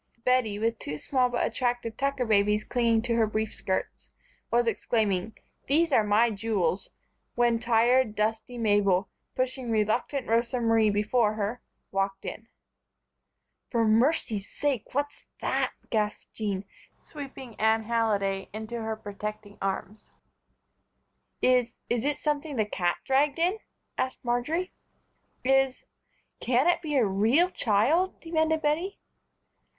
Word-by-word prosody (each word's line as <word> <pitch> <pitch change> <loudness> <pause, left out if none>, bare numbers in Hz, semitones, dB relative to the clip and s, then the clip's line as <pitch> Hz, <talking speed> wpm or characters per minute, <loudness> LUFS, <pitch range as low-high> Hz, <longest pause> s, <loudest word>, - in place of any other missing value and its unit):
Bettie, 250 -5 +2
with 225 +1 -1
two 150 +1 -5
small 255 - +1
but 245 - 0
attractive 240 -1 -1
Tucker 275 -1 -1
babies 210 -1 +3
clinging 230 -2 +1
to 240 -1 0
her 225 -1 +3
brief 215 0 -2
skirts, 190 - -3 0.4
was 240 0 +3
exclaiming: 220 -3 0 0.3
"These 320 +4 +3
are 230 -5 +5
my 215 +3 +3
jewels," 200 -4 -1 0.5
when 240 -1 +3
tired, 235 0 +3
dusty 220 +3 -1
Mabel, 205 -3 +2 0.3
pushing 255 -1 -2
reluctant 225 +5 0
Rosa 235 +2 +1
Marie 225 -2 +3
before 210 +1 +2
her, 215 +3 -3 0.3
walked 195 0 -1
in. 225 - -6 1.2
"For 230 -2 +2
mercy's 220 -3 +2
sake, 280 -7 -1
what's 285 +1 -2
that!" - - 0 0.2
gasped 210 -2 -2
Jean, 200 -3 -3 0.3
sweeping 270 -4 -9
Anne 220 0 +3
Halliday 205 -4 0
into 220 +2 -5
her 220 0 -2
protecting 210 0 -7
arms. 195 +2 -4 1.3
"Is 250 -2 +3
is 240 +1 0
it 295 0 +1
something 295 -1 -2
the 215 -3 +1
cat 175 -4 -1
dragged 280 +3 +2
in?" 360 +6 +1 0.4
asked 260 -1 -2
Marjory. 300 +10 -1 0.7
"Is 270 0 +2 0.6
can 250 +3 +2
it 350 0 +3
be 305 -3 -3
a 255 -5 +4
real 225 - +3
child?" 270 - +2
demanded 320 -1 0
Bettie. 330 +7 0
230 Hz, 130 wpm, -27 LUFS, 210-260 Hz, 1.3 s, are